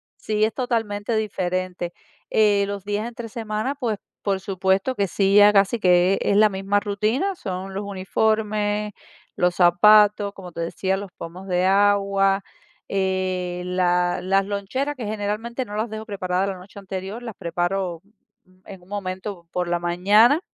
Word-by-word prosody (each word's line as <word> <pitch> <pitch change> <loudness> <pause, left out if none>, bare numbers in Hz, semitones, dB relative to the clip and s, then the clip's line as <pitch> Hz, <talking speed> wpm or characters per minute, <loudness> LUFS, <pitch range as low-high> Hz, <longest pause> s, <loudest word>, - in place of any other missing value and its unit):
Sí, 215 0 0
es 220 - -2
totalmente 225 -3 -1
diferente, 185 -4 -2 0.4
eh, 205 -2 +3
los 200 -1 -5
días 205 +3 -2
entre 235 -1 -8
semana, 220 +3 -3
pues, 240 -6 -2 0.2
por 195 -2 0
supuesto 190 +5 0
que 200 -3 0
sí, 195 +2 +2
ya 205 0 +8
casi 200 +3 +3
que 180 0 +4
es 200 - +2
la 215 +1 +7
misma 195 0 0
rutina, 215 - -1
son 190 - -5
los 200 +2 -3
uniformes, 210 +1 -1 0.4
los 180 0 +1
zapatos, 205 +3 +5
como 180 -3 -11
te 170 - -5
decía, 190 +3 -1
los 195 -1 -6
pomos 180 +1 -9
de 180 0 +1
agua, 195 0 +3 0.5
eh, 185 -2 -1
la 180 -1 +1
las 195 +1 +2
loncheras, 205 +9 -3
que 255 - -7
generalmente 215 +4 -3
no 205 - -8
las 220 +2 -1
dejo 220 0 -6
preparadas 190 -2 -1
la 195 - -3
noche 190 +3 -12
anterior, 195 +3 -6
las 230 -4 -7
preparo 175 0 -2 0.6
en 190 -2 -11
un 180 - -21
momento 190 -2 -5
por 180 -1 -2
la 175 0 0
mañana. 200 - +4
200 Hz, 160 wpm, -23 LUFS, 185-215 Hz, 0.6 s, ya